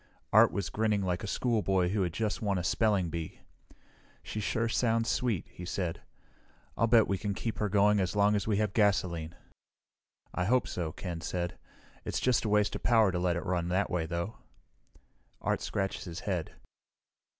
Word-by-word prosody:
Art - - +7
was 100 -3 -3
grinning 105 -2 +1
like 90 +1 -1
a - - -4
schoolboy 100 -6 +1
who 100 +1 0
had 90 -2 0
just 105 +4 -2
won 100 -3 0
a 90 - -2
spelling 95 -1 +1
bee. 80 -2 -6 0.8
"She 110 - -5
sure 115 +2 0
sounds 115 -1 +1
sweet," 120 -8 0
he 90 - -11
said. 90 -1 -3 0.7
"I'll 115 - +2
bet 115 -1 +5
we 100 -1 -1
can 100 -1 -2
keep 115 +2 -4
her 105 - 0
going 105 +1 +4
as 95 +1 -1
long 105 0 +4
as 105 0 -1
we 105 -2 +2
have 105 -2 0
gasoline." 90 -6 +1 1.0
"I 90 - -1
hope 125 +5 +2
so," 85 -3 -3
Ken 85 0 -6
said. 90 +1 -3 0.5
"It's - - -2
just 125 -3 +2
a - - 0
waste 105 0 +2
of - - -4
power 115 -5 +4
to 90 - -1
let 90 -1 +1
it 85 - -4
run 90 -2 0
that 95 +3 0
way, 85 -3 -1
though." 85 +5 -3 1.0
Art - - -1
scratched 95 0 -2
his 85 -1 -6
head. 90 -6 -3
100 Hz, 185 wpm, -30 LUFS, 90-110 Hz, 1.0 s, Art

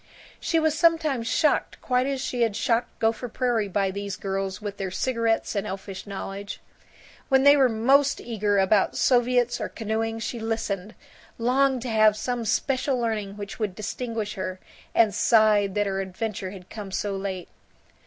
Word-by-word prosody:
She 330 - +1
was 315 -1 +1
sometimes 310 -7 +2
shocked 300 +6 +1
quite 250 0 +1
as 275 -1 -1
she 250 -2 -3
had 225 -3 +2
shocked 230 +2 0
Gopher 225 +2 0
Prairie 235 -3 0
by 195 0 0
these 200 0 -4
girls 195 -1 -3
with 205 -1 -6
their 195 -1 -3
cigarettes 230 +2 0
and 200 +1 -1
elfish 195 0 -7
knowledge. 200 0 -6 0.7
When 265 -1 +4
they 285 +1 +8
were 270 -3 +4
most 270 +5 +3
eager 210 -3 -1
about 195 +1 +3
soviets 245 -1 +2
or - - -2
canoeing, 225 0 -2
she 230 +1 -4
listened, 220 -3 -3 0.4
longed 255 +1 +2
to 250 - -4
have 215 -1 +4
some 240 +1 -2
special 260 +4 0
learning 210 -4 -2
which 200 +1 -7
would 205 -4 -2
distinguish 220 0 -4
her, 185 -2 -5 0.4
and 220 -3 +4
sighed 210 -2 +4
that 205 0 +2
her 195 -1 -1
adventure 190 0 -4
had 185 -1 -12
come 210 -3 -7
so 200 +1 -2
late. 190 -2 -4
220 Hz, 165 wpm, -25 LUFS, 200-245 Hz, 0.7 s, they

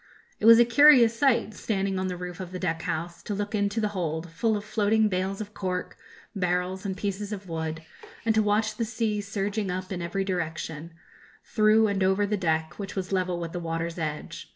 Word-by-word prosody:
It 215 - +2
was 230 0 +10
a 240 - +6
curious 240 -2 +7
sight, 235 -4 +2
standing 195 -3 -1
on 185 - -1
the 180 -1 -4
roof 180 0 -7
of 185 -2 -6
the 185 - -5
deck 165 -3 -2
house, 170 +2 -4
to 205 - -4
look 205 +1 -3
into 205 +1 0
the 210 -1 0
hold, 165 -4 -3
full 220 +5 +1
of 205 - -7
floating 215 0 +2
bales 190 +1 -2
of 210 0 -7
cork, 185 -2 -3 0.4
barrels, 180 +1 -1
and 190 -1 -3
pieces 200 +1 -3
of 200 -2 -6
wood, 160 -1 -4 0.4
and 225 - +3
to 220 - +3
watch 215 +1 +1
the 235 - 0
sea 220 -2 -1
surging 200 0 -2
up 185 +1 -4
in 180 -2 -3
every 175 +3 -2
direction, 165 -3 -4 0.5
through 215 0 +4
and 200 -2 0
over 190 +2 +3
the 210 +1 0
deck, 160 -3 -1
which 195 -1 -6
was 190 -1 -3
level 185 -2 0
with 165 -1 -5
the 175 - -4
water's 165 0 -3
edge. 155 -2 -5
195 Hz, 210 wpm, -27 LUFS, 175-210 Hz, 0.5 s, was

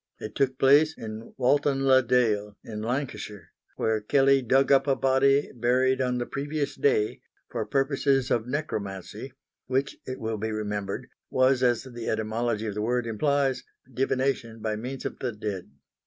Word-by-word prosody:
It 110 - -7
took 130 -1 0
place 145 +4 +5
in 110 0 -8
Walton 135 +1 +2
le 130 -1 +6
dale 110 -5 +1
in 105 -1 -6
Lancashire, 110 - -4 0.2
where 110 -1 0
Kelley 135 +4 +4
dug 135 +3 +3
up 135 0 +5
a 135 - +3
body 135 +2 +3
buried 130 +2 +2
on 125 -1 0
the 120 - -2
previous 145 +2 -3
day, 435 -1 +1 0.3
for - - -3
purposes 135 -1 +1
of 115 0 +1
necromancy, 105 - -4 0.4
which, 135 +2 -1
it 130 0 -5
will 110 0 -2
be 110 +2 -3
remembered, 105 -2 -3 0.2
was, 130 0 +3
as 120 -2 +2
the 120 -3 -6
etymology 110 0 -1
of 105 - -3
the 105 - -3
word 120 +2 0
implies, 135 +4 0 0.3
divination 130 -2 -1
by 110 0 -2
means 125 +4 -6
of - - -4
the 125 -3 -2
dead. 105 -3 -5
125 Hz, 160 wpm, -27 LUFS, 110-135 Hz, 0.4 s, le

